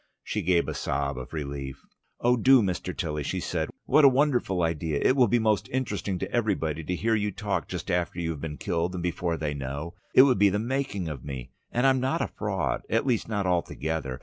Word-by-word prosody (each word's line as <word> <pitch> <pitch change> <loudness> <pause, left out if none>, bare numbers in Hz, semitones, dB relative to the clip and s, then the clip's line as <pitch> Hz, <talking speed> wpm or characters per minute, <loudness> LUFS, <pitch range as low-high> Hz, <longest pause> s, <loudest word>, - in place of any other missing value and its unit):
She - - -2
gave 85 -1 +2
a - - -2
sob 70 -2 -2
of 65 0 -8
relief. 70 -3 -5 0.4
"Oh 120 +1 +3
do, 130 0 +6
Mr. 90 -1 -3
Tilly!" 75 -3 -2
she - - -2
said. - - -2 0.2
"What 155 - +5
a 140 - +10
wonderful 125 - +1
idea! 80 -2 -1
It 130 - +3
will 125 -3 +5
be 120 - +3
most 105 -3 +1
interesting 105 -7 -2
to - - -4
everybody 80 -9 0
to 90 +4 -2
hear 115 +5 0
you 105 -1 +1
talk 100 +1 -2
just 90 +1 -4
after 90 0 -1
you've 80 -4 -3
been 75 -2 -5
killed 85 +2 -1
and 90 - -4
before 85 -1 -1
they 75 -2 -2
know. 70 +4 -5 0.2
It 130 - +10
would 130 -3 +3
be 100 0 +6
the 100 - 0
making 115 -5 -2
of 75 -5 -6
me! 65 -3 -7 0.2
And 125 +2 +1
I'm 135 -1 +4
not 130 +1 0
a - - -1
fraud, - - -2
at 115 +3 +1
least 120 -4 0
not 100 -3 -1
altogether. 80 -6 -1
90 Hz, 220 wpm, -27 LUFS, 80-115 Hz, 0.4 s, a